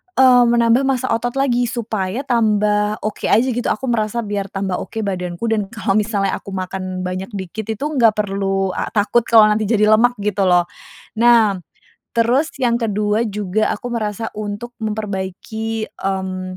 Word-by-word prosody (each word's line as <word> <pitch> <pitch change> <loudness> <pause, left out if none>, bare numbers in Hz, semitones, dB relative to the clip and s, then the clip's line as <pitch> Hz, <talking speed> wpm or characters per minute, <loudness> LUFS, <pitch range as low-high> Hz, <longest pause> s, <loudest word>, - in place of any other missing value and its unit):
eee, 255 -2 +6
menambah 235 +2 +3
masa 265 -2 0
otot 240 +2 -1
lagi 245 -3 +1
supaya 220 -1 -3
tambah, 210 -4 +1
oke 215 - -3
aja, 240 +5 +3
gitu, 245 +1 -2
aku 260 -2 -1
merasa 230 0 -1
biar 200 -2 -3
tambah, 195 -1 -3
oke, 220 - -5
badanku, 180 -2 -4
dan 210 -3 0
kalau 215 -1 0
misalnya 205 -2 -1
aku 195 - -8
makan 185 0 -4
banyak, 185 +1 -4
dikit 200 +3 -6
itu 220 +4 -4
nggak 255 -8 +3
perlu, 195 -2 -1
eee, - - -3
takut, 220 +3 +2
kalau 225 -2 +7
nanti 215 0 0
jadi 215 -1 +3
lemak, 245 +3 +4
gitu 200 -2 +1
loh. 180 -1 +4 0.6
Nah, 230 -5 +5 0.6
terus 245 +7 +2
yang 240 -3 +1
ke-2 210 +1 0
juga 210 0 -1
aku 245 +3 -6
merasa 220 -1 -3
untuk 210 +3 -6
memperbaiki, 220 +1 -4 0.2
mmm, 185 -1 -3
215 Hz, 160 wpm, -19 LUFS, 195-235 Hz, 0.6 s, kalau